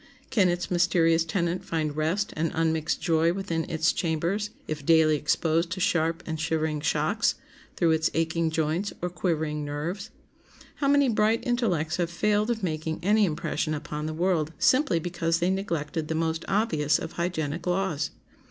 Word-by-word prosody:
Can 195 -5 +4
its 175 +1 -2
mysterious 170 -2 +3
tenant 170 +1 -1
find 155 -3 -2
rest 165 +7 0
and 160 +1 -1
unmixed 160 -1 0
joy 165 0 +2
within 180 -3 -3
its 160 -1 +2
chambers 175 +5 -1 0.2
if 155 -2 -4
daily 160 0 +5
exposed 160 +3 +1
to 185 - -5
sharp 165 -1 +1
and 160 -1 -4
shivering 155 -1 -1
shocks 150 - +1 0.4
through 170 -1 +2
its 160 0 +2
aching 165 0 +1
joints 160 +5 -1
or 180 - -1
quivering 155 -3 -1
nerves? 155 +7 -4 0.7
How 280 - 0
many 285 0 +4
bright 220 0 +2
intellects 210 - 0
have 175 -2 0
failed 210 +5 +1
of 225 -3 -1
making 160 -2 -2
any 210 +2 +4
impression 155 -1 -2
upon 150 +1 -5
the 155 - -4
world 165 -3 +1
simply 260 - +3
because 165 0 -1
they 175 +2 +1
neglected 165 -5 -2
the 160 - -2
most 160 0 -1
obvious 175 -8 +2
of - - -6
hygienic 170 -1 -3
laws! 175 -5 0
165 Hz, 160 wpm, -27 LUFS, 155-185 Hz, 0.7 s, daily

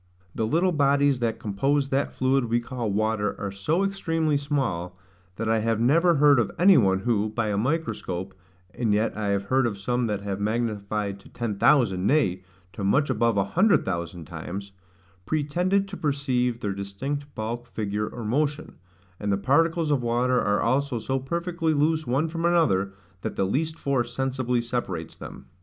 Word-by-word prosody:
The 110 - -1
little 170 +9 +2
bodies 140 -3 +3
that 115 -2 -1
compose 135 +7 0
that 135 +1 0
fluid 130 0 +1
we 120 +1 +1
call 120 -1 -4
water 110 0 0
are 100 -1 -3
so 150 - 0
extremely 165 -6 0
small, 130 - -2 0.4
that 115 - -3
I 110 0 +2
have 115 0 0
never 165 +8 +4
heard 145 -2 +5
of 115 - +1
any 190 +2 +6
one 95 -7 +3
who, 110 -2 +1
by 110 0 -1
a 105 - 0
microscope, 100 - -2 0.4
(and 110 -4 +1
yet 110 +2 0
I 105 -1 -2
have 100 -1 0
heard 130 +5 +2
of 105 -4 -4
some 120 +4 -1
that 105 -2 -2
have 100 -1 -4
magnified 105 -2 -2
to - - -17
ten 110 -4 -4
thousand; 105 -10 +3
nay, 95 -12 +2 0.3
to 100 - -6
much 135 +8 +2
above 115 -2 +1
a 100 - +3
hundred 185 - +3
thousand 85 -2 -4
times,) 100 +7 -7 0.6
pretended 180 +6 +1
to 195 - -7
perceive 130 -5 0
their 100 -1 -1
distinct 135 +9 -5
bulk, 115 +2 -4
figure, 105 0 -3
or 120 -2 -7
motion; 145 +6 -1 0.4
and 105 -1 -1
the 100 - +2
particles 160 - +2
of 140 -3 +2
water 125 +2 +1
are 105 0 +1
also 130 +2 +1
so 135 +4 -2
perfectly 170 +3 -1
loose 155 0 +1
one 135 +6 +1
from 165 +1 -4
another, 160 - +2 0.3
that - - -4
the 95 - +1
least 155 +10 -1
force 130 -6 -1
sensibly 130 -2 0
separates 120 +1 -4
them. - - -10
120 Hz, 180 wpm, -25 LUFS, 105-145 Hz, 0.6 s, any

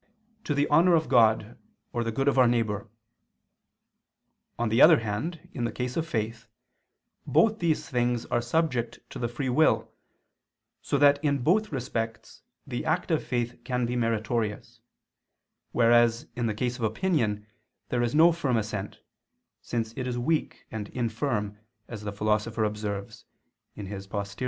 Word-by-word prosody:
to 150 - -1
the 145 +1 +2
honor 170 +4 +5
of 160 -1 +1
God 110 -2 +3 0.3
or 120 - 0
the 115 - -2
good 135 +5 -1
of 140 -1 +3
our 125 - +6
neighbor. 110 -3 0 1.7
On 120 -1 0
the 115 +3 +3
other 160 -2 +8
hand, 145 +10 -4
in 120 - -3
the 115 - -1
case 125 0 -4
of 165 0 -1
faith, 115 -2 -3 0.8
both 220 -1 +3
these 165 -3 0
things 120 -2 0
are 120 - 0
subject 120 -3 -1
to - - -7
the 120 - -1
free 120 +3 -4
will 155 +6 +2 0.9
so 145 - 0
that 145 +1 +4
in 140 -2 +2
both 210 - +2
respects 115 -4 -4 0.2
the 125 -4 -4
act 170 +3 -1
of 160 - +1
faith 120 -1 -3
can 125 0 -1
be 120 +1 -2
meritorious: 115 -1 -2 0.9
whereas 120 0 +4
in 120 -1 -1
the 110 - -2
case 120 +3 -2
of 120 - -6
opinion, 110 - 0 0.4
there 120 - 0
is 120 +3 0
no 165 +3 +7
firm 140 -8 0
assent, 105 -2 -4 0.6
since 115 -2 -3
it 130 -1 -3
is 125 -1 -2
weak 150 +6 -1
and 110 -2 -5
infirm, 110 -3 -2 0.3
as 115 -3 -7
the 105 -1 -4
Philosopher 105 +2 0
observes 105 -2 -4 0.8
(Poster. 100 0 -5
120 Hz, 155 wpm, -27 LUFS, 110-140 Hz, 1.7 s, other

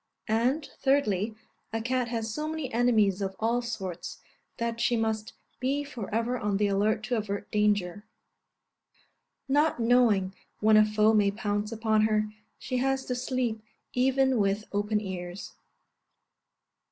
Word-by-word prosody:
And, 250 +7 +1
thirdly, 220 -7 +1 0.4
a 225 - -1
cat 250 +1 0
has 225 -2 -3
so 300 +4 -3
many 310 -5 -4
enemies 220 -5 +3
of 190 -1 -2
all 235 +2 +1
sorts, 195 -7 -5 0.4
that 230 0 -2
she 240 0 +2
must 220 -1 -2 0.3
be 275 +3 0
for 250 -8 -7
ever 230 +3 0
on 205 -2 0
the 210 - +2
alert 210 +2 +1
to 240 +2 -1
avert 205 -2 -4
danger; 205 -2 +1 1.4
not 290 +1 +2
knowing 230 -5 +3 0.3
when 215 0 +5
a 215 - +8
foe 215 +1 +3
may 205 -2 +4
pounce 205 0 -2
upon 220 -1 +2
her, 215 -1 0 0.3
she 255 - -3
has 265 +1 0
to 250 - -2
sleep 245 -3 -2 0.3
even 265 0 +2
with 200 +1 +1
open 210 +1 +1
ears. 180 -2 -6
220 Hz, 140 wpm, -28 LUFS, 210-245 Hz, 1.4 s, a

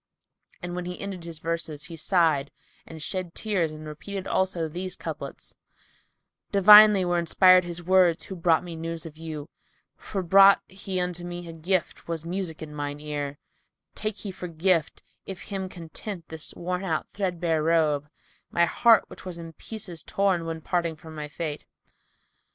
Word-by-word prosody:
And 175 0 -4
when 180 0 -4
he 180 0 -6
ended 190 -4 -6
his 165 -2 -7
verses, 165 -2 -3
he 170 -2 -6
sighed 160 -4 +2 0.4
and 160 - -9
shed 185 -2 -4
tears 190 -7 0
and 155 0 -9
repeated 185 +6 -6
also 185 -4 0
these 180 +4 -5
couplets, - - -7 1.0
"Divinely 210 0 +9
were 175 0 +1
inspired 185 +2 +6
his 175 0 -5
words 180 -2 +4
who 190 - -7
brought 170 -2 +3
me 175 -2 -7
news 165 0 -4
of 155 -2 -9
you; 155 -2 -6 0.3
* - - -42
For 195 -3 -2
brought 195 +3 +7
he 190 0 -3
unto 180 -1 -1
me 175 0 -6
a 165 - -7
gift 170 +2 -2
was 165 -1 -4
music 175 -3 -4
in 150 -1 -9
mine 145 0 -4
ear: 145 -1 -4 0.6
Take 215 -1 -3
he 200 - -5
for 180 -1 -7
gift, 170 -1 0 0.2
if 190 -2 -6
him 190 -1 -3
content, 175 +1 -7
this 160 -1 -7
worn 180 +2 -3
out 160 -5 -1
threadbare 175 -5 -1
robe, 155 -3 +2 0.2
* - - -36
My 170 - +4
heart, 230 +5 +5
which - - -12
was 180 -2 -6
in 165 -1 -9
pieces 190 -4 -6
torn 190 -4 0
when 165 -1 -4
parting 170 -1 -1
from 160 +1 -12
my 150 -1 -5
fete." 150 0 -5
170 Hz, 175 wpm, -26 LUFS, 160-185 Hz, 1.0 s, Divinely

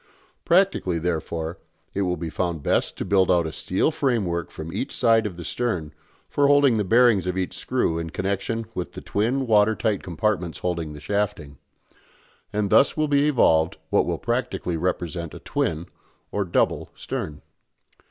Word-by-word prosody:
Practically, 175 - +3
therefore, 80 -1 -3 0.3
it 100 - -1
will 90 -2 0
be 80 0 -5
found 85 -1 -2
best - - 0
to - - -3
build 95 -2 +3
out 90 -2 +3
a 80 - -3
steel 95 - 0
framework 100 - 0
from 80 +1 -8
each - - -3
side 115 -3 +3
of 90 -4 -8
the 85 - -6
stern 90 -9 -2 0.3
for 145 -1 +2
holding 140 -4 +5
the 105 - +1
bearings 110 -2 +4
of 90 0 -1
each 95 -1 -2
screw 120 -10 0
in 85 0 -4
connection 100 +6 -2
with 90 - -5
the - - -7
twin 125 +6 0
water 110 -1 +4
tight 110 -4 0
compartments 90 -1 -1
holding 85 -4 -3
the 75 - -9
shafting; 75 -5 -2 0.9
and 105 -1 -1
thus 140 - +5
will 155 0 +2
be 145 0 +3
evolved 80 - +3
what - - +3
will - - -1
practically 90 - -2
represent 85 -1 -2
a - - -8
twin, 80 +1 -2 0.5
or 100 -1 -1
double, 85 - 0
stern. 75 -2 -5
95 Hz, 170 wpm, -24 LUFS, 85-115 Hz, 0.9 s, holding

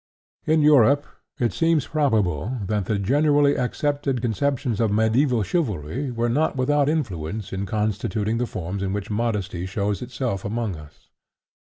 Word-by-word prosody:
In 155 -1 +3
Europe 145 -1 +5 0.3
it 120 -5 0
seems 165 0 +2
probable 110 - 0
that 105 -1 -1
the 105 +2 0
generally 145 +6 +3
accepted 140 +1 -1
conceptions 120 0 -1
of 115 - +2
mediæval 110 +2 +2
chivalry 125 - -2
were 120 -1 -1
not 145 +7 +1
without 145 +2 +2
influence 105 - -3
in 95 +1 -3
constituting 105 +2 -1
the 125 - 0
forms 90 +3 -4
in 95 -1 -1
which 105 +1 -4
modesty 105 -5 -2
shows 100 0 -2
itself 125 -5 -3
among 110 -2 -2
us. 75 -1 -15
115 Hz, 145 wpm, -23 LUFS, 100-140 Hz, 0.3 s, Europe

